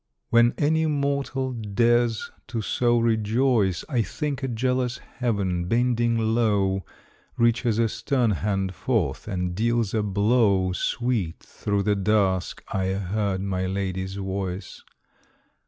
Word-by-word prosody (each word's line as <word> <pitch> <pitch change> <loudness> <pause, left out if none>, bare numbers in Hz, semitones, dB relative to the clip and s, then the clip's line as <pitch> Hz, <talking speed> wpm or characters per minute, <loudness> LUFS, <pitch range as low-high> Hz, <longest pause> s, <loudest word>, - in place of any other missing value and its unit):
When 120 0 +5
any 160 +2 +2
mortal 140 -2 -1
dares 115 +1 +1 0.2
to 115 -4 -3
so 120 +4 +2
rejoice, 110 -3 +1
I 125 -6 +1
think 140 +4 -3
a 135 - -1
jealous 125 +1 0
Heaven, 100 -8 -2
bending 120 +2 +1
low, 105 -4 +1 0.5
Reaches 115 -1 +2
a 115 0 +3
stern 125 0 0
hand 95 0 -1
forth 85 - -1
and 90 -3 -2
deals 115 +1 0
a 110 - +2
blow. 100 -2 +2
Sweet 110 -3 -1
through 100 -1 -2
the 105 0 +2
dusk 95 -2 +1
I 95 -1 -1
heard 100 0 -1
my 95 -1 -1
lady's 95 0 -3
voice. 95 -1 -4
110 Hz, 120 wpm, -25 LUFS, 95-120 Hz, 0.5 s, When